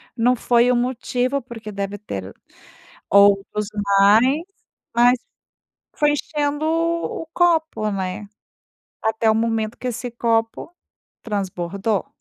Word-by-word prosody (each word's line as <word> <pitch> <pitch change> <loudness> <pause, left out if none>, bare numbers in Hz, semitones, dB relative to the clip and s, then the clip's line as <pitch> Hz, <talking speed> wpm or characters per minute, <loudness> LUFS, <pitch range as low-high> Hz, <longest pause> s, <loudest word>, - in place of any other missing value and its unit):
não 245 +1 +3
foi 240 +1 +3
o - - +2
motivo, 250 +2 -1
porque 225 -3 -9
deve 200 0 -4
ter 100 - -7 0.8
outros 200 +1 +3 0.3
mais, 225 +9 +5 0.5
mas 245 +1 +5 0.8
foi 295 -1 +3
enchendo 295 0 -2
o 330 0 -1
copo, 320 -11 +1
né. 190 +1 -4 0.7
Até 220 0 +2
o - - +1
momento 225 0 -1
que 255 - -5
esse 245 +1 -4
copo 230 +7 -1 0.5
transbordou. 195 -1 -2
230 Hz, 110 wpm, -21 LUFS, 205-255 Hz, 0.8 s, mais